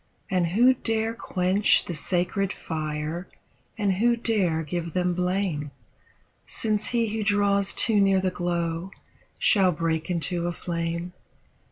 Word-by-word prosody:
And 180 -2 +2
who 235 +9 +5
daxe 225 -2 0
quench 185 +2 +2
the 175 - -4
sacred 180 +5 -1
fire, 155 +1 -4 0.5
and 205 -3 +1
who 235 +3 +3
dare 195 -9 +1
give 170 +1 -4
them 180 -1 +1
blame. 180 -4 -1 0.8
Since 215 -2 -1
he 230 -2 0
who 220 - -1
draws 200 -1 +1
too 220 -3 +4
near 195 -1 +4
the 185 0 0
glow 175 0 -2 0.5
shall 190 -3 +3
break 165 0 -2
into 170 0 -1
a 175 - -2
flame? 170 +1 -4
180 Hz, 135 wpm, -25 LUFS, 170-205 Hz, 0.8 s, who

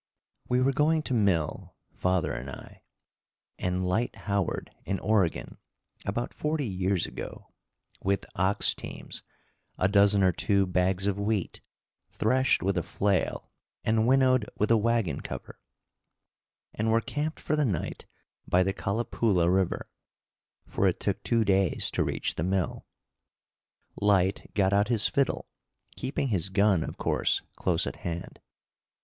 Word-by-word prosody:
We 125 +1 +2
were 135 +2 +3
going 155 +3 +2
to 130 - -3
mill, 95 - 0 0.2
father 90 -1 0
and - - -5
I, - - -11 0.8
and 90 0 -1
Lyte 110 +7 0
Howard, 100 -3 -1
in 95 - -2
Oregon, 100 -6 0 0.5
about 115 +4 -2
forty 150 -1 -1
years 95 -3 0
ago, - - -8 0.5
with 100 +1 0
ox 95 +2 +3
teams, - - -6 0.6
a 95 - +3
dozen 100 0 +5
or 95 - +5
two 100 +2 +2
bags 90 +1 +1
of 100 0 0
wheat, 100 -3 -1 0.5
threshed 130 +4 +2
with 95 -1 +1
a - - -1
flail 100 +1 -1 0.3
and 110 +1 +2
winnowed 130 -3 +4
with 105 +2 +1
a - - +7
wagon 115 -4 0
cover, - - -7 1.1
and 110 +1 -1
were 115 +1 +4
camped 150 +6 -3
for 155 - -1
the 150 - +2
night 100 - -3 0.4
by 90 +1 +4
the 95 +1 0
Calipoola 100 -4 +1
River; 95 -2 0 0.8
for - - +1
it - - 0
took - - -1
two 115 -2 +1
days 95 -3 +2
to - - +1
reach - - -2
the 75 - -3
mill. 95 -1 -1 1.1
Lyte 100 -2 +2
got 95 -1 +3
out 100 +1 +3
his 115 -3 +3
fiddle, 140 -2 0 0.5
keeping 135 +1 -2
his 95 -4 0
gun, 95 -3 +3
of - - -6
course, - - +1
close - - +1
at - - -5
hand. 85 0 -6
100 Hz, 145 wpm, -28 LUFS, 95-115 Hz, 1.1 s, a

